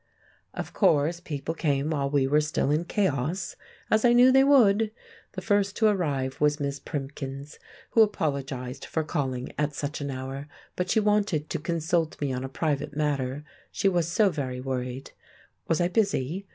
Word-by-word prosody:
Of - - -5
course, 165 -3 +3
people 155 -2 -4
came 145 -2 0
while 140 -3 0
we 140 -2 +2
were 150 +3 +3
still 150 -2 0
in 155 +3 +1
chaos, 175 -2 -1 0.4
as 215 0 +3
I 240 -1 +5
knew 250 +2 +7
they 270 +1 +6
would. 225 -6 +5 0.4
The - - -6
first 205 -2 +1
to 220 - +2
arrive 145 -10 -1
was 150 0 +3
Miss 140 -1 -2
Primkins, 140 0 -6 0.3
who 225 - +5
apologised 140 - -1
for 160 - -2
calling 130 -5 -3
at 150 -1 0
such 145 +1 -4
an 140 - -3
hour, 135 +2 -5 0.3
but 180 0 -2
she 220 - +3
wanted 205 -7 +1
to - - -1
consult 165 0 -1
me 140 -3 -1
on 125 0 -3
a 135 - -4
private 145 0 -2
matter, 145 -2 -1 0.3
she - - 0
was 175 -4 +2
so 195 +4 +3
very 130 -5 -4
worried. 130 0 -4 0.6
Was 165 - +1
I 175 - +3
busy? 195 - 0
150 Hz, 175 wpm, -27 LUFS, 140-185 Hz, 0.6 s, knew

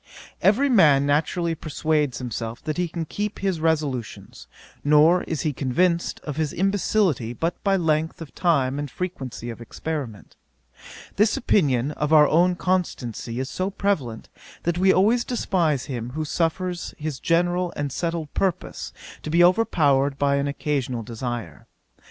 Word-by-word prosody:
Every 240 +8 +4
man 150 - +5
naturally 165 +4 +1
persuades 150 -3 -1
himself 115 -2 -5
that 155 - -3
he 180 0 0
can 165 0 -4
keep 205 +6 -4
his 190 -4 -1
resolutions, 150 -8 -2 0.4
nor 150 +5 +5
is 160 - -3
he 155 -3 -1
convinced 170 +7 0
of 150 -1 -6
his 155 -3 -1
imbecility 190 - +1
but 165 +8 -3
by 195 -1 +3
length 160 -2 0
of 165 -3 -9
time 140 -6 +1
and 145 -1 -4
frequency 130 -8 -5
of 115 - -10
experiment. 125 -3 -6 0.8
This 210 +1 +3
opinion 140 - +2
of 150 0 -2
our 150 -2 +7
own 175 +4 +3
constancy 130 - -2
is 130 +1 -3
so 185 +5 -1
prevalent, 165 - -2 0.4
that 175 +1 0
we 190 +1 +5
always 220 +7 +3
despise 170 - 0
him 120 -4 -5
who 155 +1 -2
suffers 175 +3 -2
his 150 -3 -4
general 175 +1 +1
and 145 -1 -3
settled 165 0 -3
purpose 190 -4 -2 0.3
to - - -6
be 170 +3 +4
overpowered 145 -8 +3
by 140 0 +2
an 140 0 0
occasional 140 -4 -2
desire. 120 0 -6
155 Hz, 150 wpm, -24 LUFS, 135-180 Hz, 0.8 s, our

